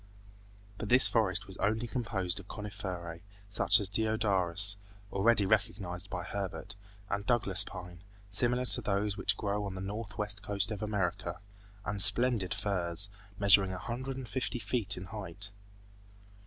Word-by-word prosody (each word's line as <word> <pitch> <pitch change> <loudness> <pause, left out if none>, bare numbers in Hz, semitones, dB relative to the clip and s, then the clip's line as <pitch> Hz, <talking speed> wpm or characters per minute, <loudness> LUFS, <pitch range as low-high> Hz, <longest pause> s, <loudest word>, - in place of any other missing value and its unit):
But 105 - -5
this 125 +2 +9
forest 110 -6 +1
was 95 -1 -10
only 110 +3 0
composed 100 -7 -2
of 100 - -13
coniferae, 95 -6 -6 0.3
such 100 +3 +4
as 100 - 0
deodaras, 100 -3 0 0.4
already 105 +1 +3
recognized 90 -1 -1
by 90 -2 -4
Herbert, 100 +3 -5 0.3
and 100 0 -2
Douglas 105 -5 +3
pine, 90 -2 -10 0.3
similar 120 +5 +1
to - - +2
those 100 0 -1
which 100 - 0
grow 105 0 -2
on 100 -2 -5
the - - -6
northwest 105 0 -3
coast 100 0 +3
of 105 - -5
America, 95 -4 -2 0.5
and 100 -2 +1
splendid 105 0 +6
firs, 100 -2 +1 0.3
measuring 100 -1 +4
a - - -5
hundred 130 +7 -5
and 130 -2 -7
fifty 125 +1 -3
feet 105 -2 -1
in 90 - -7
height. 100 0 -8
100 Hz, 145 wpm, -31 LUFS, 95-110 Hz, 0.5 s, this